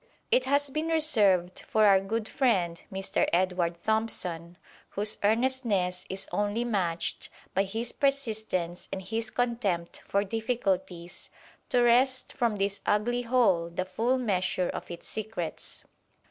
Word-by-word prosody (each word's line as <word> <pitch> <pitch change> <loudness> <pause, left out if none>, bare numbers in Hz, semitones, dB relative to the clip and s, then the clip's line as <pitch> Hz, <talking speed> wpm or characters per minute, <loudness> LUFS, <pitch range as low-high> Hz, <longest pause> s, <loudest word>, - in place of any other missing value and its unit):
It - - +4
has 285 0 +2
been 310 +3 -1
reserved 210 - +3
for 215 -1 +3
our 195 -2 +7
good 215 +3 -3
friend 190 - +1
Mr. 195 0 0
Edward 180 -1 +1
Thompson, 180 -6 -1 0.3
whose 210 +1 -1
earnestness 215 -5 +1
is 190 +1 -5
only 205 +3 0
matched 185 -8 -1 0.2
by 195 +1 +2
his 225 +4 -3
persistence 220 -11 -1
and 190 - -4
his 225 +4 -2
contempt 220 -9 -1
for 200 0 +2
difficulties, 195 -5 -2 0.4
to 245 -1 +3
wrest 255 +2 +3
from 235 -4 +1
this 200 0 -1
ugly 240 +4 +1
hole 230 -9 +2
the 180 +2 -3
full 230 +7 0
measure 185 -6 0
of - - -6
its 170 - -8
secrets. 210 -7 -5
210 Hz, 130 wpm, -28 LUFS, 185-240 Hz, 0.4 s, our